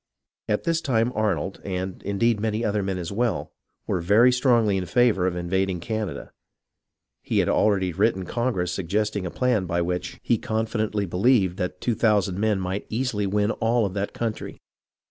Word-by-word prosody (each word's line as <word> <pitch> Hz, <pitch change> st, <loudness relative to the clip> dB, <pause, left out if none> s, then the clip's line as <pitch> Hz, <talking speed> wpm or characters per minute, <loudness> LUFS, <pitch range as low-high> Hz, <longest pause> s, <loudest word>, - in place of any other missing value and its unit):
At 105 Hz, -, 0 dB
this 165 Hz, -1 st, 0 dB
time 120 Hz, -4 st, +1 dB
Arnold, 100 Hz, -5 st, -1 dB
and, 95 Hz, -1 st, -4 dB
indeed, 105 Hz, +3 st, +1 dB
many 110 Hz, +1 st, -1 dB
other 105 Hz, -1 st, 0 dB
men 95 Hz, -1 st, -2 dB
as 90 Hz, 0 st, -5 dB
well, 115 Hz, +2 st, -1 dB, 0.3 s
were 90 Hz, -, -1 dB
very 105 Hz, +8 st, +5 dB
strongly 120 Hz, -5 st, +3 dB
in 90 Hz, -1 st, -3 dB
favour 105 Hz, -2 st, +3 dB
of 90 Hz, -, -1 dB
invading 90 Hz, +1 st, -1 dB
Canada. 110 Hz, +1 st, -4 dB, 0.9 s
He -, -, -2 dB
had -, -, +3 dB
already 95 Hz, -4 st, +2 dB
written 95 Hz, 0 st, +1 dB
Congress 105 Hz, -5 st, -1 dB
suggesting 100 Hz, +2 st, -1 dB
a -, -, -3 dB
plan 115 Hz, -3 st, 0 dB
by 85 Hz, 0 st, 0 dB
which 90 Hz, +1 st, -3 dB
he 115 Hz, -, +1 dB
confidently 110 Hz, -2 st, -1 dB
believed 95 Hz, 0 st, +2 dB
that 90 Hz, -2 st, -4 dB
2000 105 Hz, -5 st, +1 dB
men 105 Hz, -2 st, +1 dB
might 95 Hz, +2 st, -3 dB
easily 110 Hz, -4 st, -1 dB
win 105 Hz, +2 st, +1 dB
all 115 Hz, 0 st, +1 dB
of 95 Hz, -, -3 dB
that 100 Hz, 0 st, -2 dB
country. 115 Hz, -2 st, -4 dB
105 Hz, 165 wpm, -24 LUFS, 95-115 Hz, 0.9 s, very